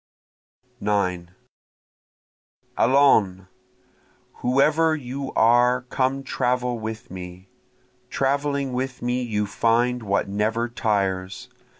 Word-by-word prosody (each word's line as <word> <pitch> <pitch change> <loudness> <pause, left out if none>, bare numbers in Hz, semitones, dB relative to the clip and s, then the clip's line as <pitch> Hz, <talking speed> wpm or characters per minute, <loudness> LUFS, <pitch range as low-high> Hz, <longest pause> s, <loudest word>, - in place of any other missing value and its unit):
9 90 -4 -1 1.5
Allons! 110 -8 +3 0.9
whoever 155 +5 +2
you 135 -1 -6
are 120 +2 +4
come 135 +1 0
travel 125 -2 -1
with 110 -2 -7
me! 90 0 -9 0.6
Traveling 140 0 -1
with 130 0 -4
me 125 +1 0
you 105 -4 -1
find 120 +4 +1
what 100 -2 -1
never 110 +4 -1
tires. 100 0 -2
120 Hz, 85 wpm, -23 LUFS, 105-130 Hz, 1.5 s, are